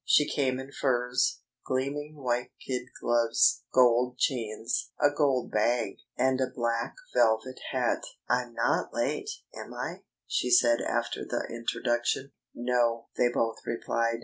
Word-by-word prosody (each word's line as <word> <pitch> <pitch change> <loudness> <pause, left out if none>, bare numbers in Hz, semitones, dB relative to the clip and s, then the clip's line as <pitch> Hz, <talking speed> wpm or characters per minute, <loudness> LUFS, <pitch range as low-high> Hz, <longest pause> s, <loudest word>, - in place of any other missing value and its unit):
She 150 - +4
came 130 -2 0
in 135 +1 -8
furs, 125 -2 +1 0.2
gleaming 145 +3 -2
white 125 -3 -2
kid 125 -1 -3
gloves, 120 -1 +3
gold 125 0 +4
chains, 115 -4 -1
a 145 - +5
gold 140 -4 +1
bag, 115 -1 +1 0.2
and 130 +1 +2
a 130 - +1
black 115 -2 -2 0.2
velvet 110 +4 +2
hat. - - +1 0.3
"I'm 125 -1 0
not - - 0
late, - - -1 0.2
am - - -8
I?" - - -4 0.2
she 125 - 0
said 120 -1 +5
after - - -1
the - - -2
introduction. 120 +3 -1 0.2
"No," 120 -1 +1
they 120 - +3
both 115 -1 0
replied. 115 0 -1
125 Hz, 135 wpm, -29 LUFS, 115-130 Hz, 0.3 s, a